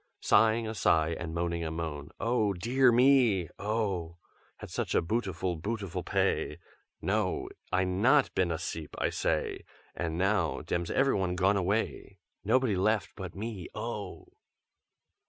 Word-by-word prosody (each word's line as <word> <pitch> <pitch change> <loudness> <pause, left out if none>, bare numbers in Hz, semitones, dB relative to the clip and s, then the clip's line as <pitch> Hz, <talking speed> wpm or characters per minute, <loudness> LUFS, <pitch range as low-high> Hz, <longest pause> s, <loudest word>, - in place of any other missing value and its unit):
Sighing 110 +1 +4
a 110 - -3
sigh 80 -6 +3
and 80 0 -4
moaning 85 0 -2
a 80 - -2
moan, 80 -3 -5
'Oh 115 -3 +1
dear 125 +7 +3
me, 120 - +4
oh! 100 -6 -2 0.4
Had - - -10
such - - -2
a - - +4
bootiful, 95 -3 -2
bootiful 100 0 -4
p'ay! - - 0 0.5
No! - - 0 0.2
I 95 +1 +2
not 115 +10 +3
been 95 -2 +1
as'eep, 80 -2 -5
I - - 0
say! - - -1 0.3
And 80 -1 -3
now 95 -3 +1
dem's 85 -1 -2
everyone 95 -10 +1
gone 95 +2 +3
away, 100 +4 -1 0.3
Nobody 130 -6 +2
left 105 +3 +1
but 95 -2 -7
me, 105 -3 -5
oh!'" - - -5
95 Hz, 135 wpm, -30 LUFS, 85-110 Hz, 0.5 s, Sighing